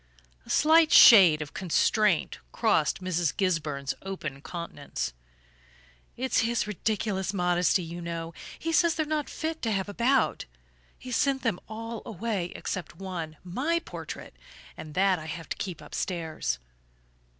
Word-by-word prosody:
A - - -14
slight 320 +1 +5
shade 175 -10 +9
of 145 - -13
constraint 185 - +1
crossed 190 - +1
Mrs. 175 -3 0
Gisburn's 150 -8 -1
open 155 -8 -6
countenance. 155 - -5 1.0
"It's 260 0 +1
his 235 +1 +1
ridiculous 205 -2 -2
modesty, 180 0 +2
you 170 +1 -7
know. 170 -1 -5 0.2
He 330 - -3
says 335 0 +3
they're 310 - 0
not 305 -1 -2
fit 320 0 -4
to 225 - -1
have 195 -1 -1
about; 240 +6 +1 0.5
he's 250 -2 -3
sent 275 -2 +1
them 225 -7 0
all 225 +1 -6
away 215 -5 -3
except 185 -3 -5
one 170 -5 -6
my 260 - -1
portrait 335 - -8 0.4
and 155 -1 -9
that 190 -1 +3
I 155 - -9
have 165 +1 -7
to - - -3
keep 180 -5 -5
upstairs." 165 -4 -3
190 Hz, 140 wpm, -28 LUFS, 170-235 Hz, 1.0 s, shade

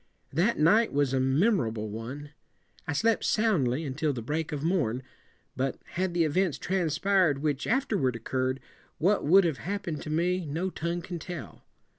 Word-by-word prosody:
That 190 +10 +2
night 210 +9 +4
was 140 -2 +1
a 135 - +2
me 135 - +3
mor 135 - +1
able 110 -1 -4
one. 125 +8 -7 0.6
I 155 - -1
slept 220 +9 +2
soundly 165 - +1
until 150 +1 -1
the 120 -3 -5
break 155 +5 -2
of 150 -1 -3
morn, 145 -8 0 0.5
but 130 0 -2
had 180 -1 -2
the 170 - +3
events 165 +1 +1
transpired 175 -3 +1
which 145 -3 -1
afterward 210 - +1
occur 130 +3 -1
red, 130 +1 -2 0.4
what 185 0 +2
would 190 +5 +7
have 160 -5 -1
hap 200 +3 -3
pen 160 -3 -3
ed - - -8
to - - -7
me 175 +4 +1
no 170 +6 -2
tongue 170 +1 -3
can 175 -1 -5
tell. 160 - -8
155 Hz, 185 wpm, -28 LUFS, 135-185 Hz, 0.6 s, would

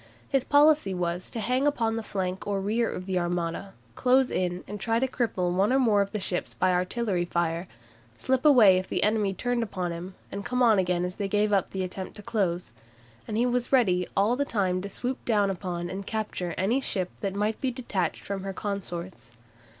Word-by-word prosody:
His 270 -2 +1
policy 290 -8 +4
was 175 0 -2
to 230 - -5
hang 255 +6 +1
upon 230 -6 +1
the 225 - -2
flank 190 -3 -3
or 200 -1 0
rear 220 +4 0
of 180 - -6
the 185 -1 0
Armada, 175 +2 -2 0.2
close 255 - +3
in 180 0 -1
and 205 +1 -6
try 225 +4 +1
to 265 - +1
cripple 220 -9 -1
one 195 +5 +2
or 265 - +4
more 205 -6 +3
ships 185 -3 -3
by 185 0 +2
artillery 185 +1 0
fire, 170 0 -1 0.5
slip 260 -1 0
away 225 -11 +7
if 185 - -7
the - - 0
enemy 210 -2 +2
turned 245 +4 -1
upon 185 -5 -3
him, 175 +3 -7 0.3
come 250 +2 0
on 220 -4 +5
again 180 -1 +1
as 180 +1 -5
they 200 - -1
gave 210 +1 +1
up 195 -2 +2
the 190 -1 -3
attempt 185 +1 -6
to 210 - -10
close, 185 -5 -1 0.5
and 215 - -2
he 240 - +3
was 245 0 0
ready 185 -9 +3
all 205 +5 +3
the 285 - +1
time 190 -8 0
to 200 - -6
swoop 250 +6 -4
down 205 -4 +2
upon 175 -2 -4
and 190 +2 -6
capture 210 -6 -3
any 230 +8 +1
ship 185 -8 -1
that 195 -1 -3
might 210 +2 -1
be 265 - +1
detached 225 - -2
from 195 -1 -4
her 195 0 -4
consorts. 185 - -5
200 Hz, 205 wpm, -27 LUFS, 180-235 Hz, 0.5 s, away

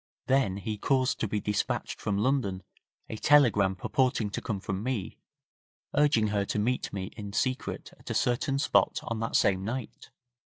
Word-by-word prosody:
Then 130 -8 +2
he 105 +1 -4
caused 130 +1 +1
to 110 - 0
be 105 +1 -1
dispatched 105 +1 -2
from 100 -2 -1
London 105 -5 0 0.4
a 110 - -6
telegram 105 -9 +4
purporting 120 +1 0
to - - -3
come 110 -5 -3
from 95 0 -3
me, 120 -5 -3 0.7
urging 145 -7 +3
her 100 -1 +1
to 100 - -3
meet 120 +5 0
me 95 -1 -5
in 100 -3 -7
secret 130 +4 -2
at - - -12
a - - -2
certain 130 +3 +1
spot 140 - +2
on 115 -2 -3
that 115 - -2
same 95 -1 +3
night. 120 +3 -5
110 Hz, 170 wpm, -29 LUFS, 100-130 Hz, 0.7 s, telegram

